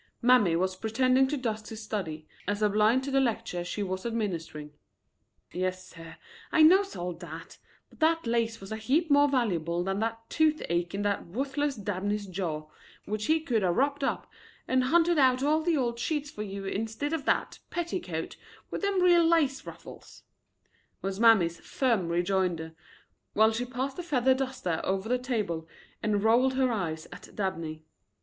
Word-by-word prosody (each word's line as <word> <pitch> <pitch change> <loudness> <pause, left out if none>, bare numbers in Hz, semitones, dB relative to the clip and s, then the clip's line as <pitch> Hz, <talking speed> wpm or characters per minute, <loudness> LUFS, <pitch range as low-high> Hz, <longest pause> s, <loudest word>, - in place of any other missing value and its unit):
Mammy 235 -8 +4
was 185 +2 0
pretending 255 +6 +2
to 295 +2 -2
dust 220 -4 -3
his 220 - -7
study, 165 -8 -4 0.2
as 205 +1 -1
a 210 - +4
blind 215 +5 +3
to 275 - -4
the 270 - +3
lecture 225 -7 -1
she 205 +4 -3
was 185 -1 -3
administering. 170 -10 -4 0.8
"Yes, 185 0 -3
sir, 165 -1 -11 0.4
I 315 - +5
knows 385 +5 +5
all 175 0 -3
that; 165 -1 -10 0.3
but - - -22
that 325 -1 +2
lace 230 -1 0
was 195 +1 -10
a 220 - -2
heap 285 +9 +1
more 285 0 +6
valuable 175 - 0
than 195 +2 -2
that 225 +1 -3
toothache 195 - 0
in 205 - -2
that 200 -3 -1
wuthless 275 +7 -2
Dabney's 205 0 -2
jaw, 170 -5 -4 0.4
which 210 0 -3
he 315 0 +3
could 245 -9 0
er 185 -2 +2
wropped 280 +8 0
up, - - -1 0.4
and 255 0 +2
hunted 340 +3 +3
out 260 -1 +4
all 305 +2 +3
the 325 -1 +1
old 235 -3 -1
sheets 295 +2 -2
for 210 - -7
you 200 -1 -5
instid 225 +9 -3
of 305 -4 -2
that - - 0
petticoat 330 - -4 0.3
with - - -3
them 400 -2 +1
real 350 -1 +6
lace 320 -5 +2
ruffles," - - -12 0.8
was 195 +1 -3
Mammy's 200 -8 +5
firm 230 -10 0
rejoinder, 175 -2 0 0.6
while 220 +1 +5
she 235 +3 -2
passed 265 +4 -4
a - - -1
feather 265 -6 +2
duster 260 -11 -2
over 190 +2 -1
the 250 +2 +1
table 210 -11 -2 0.3
and 210 -1 0
rolled 250 +4 +4
her 260 -1 +2
eyes 165 -7 -3
at 180 - -12
Dabney. 165 -6 -3
220 Hz, 170 wpm, -28 LUFS, 185-270 Hz, 0.8 s, more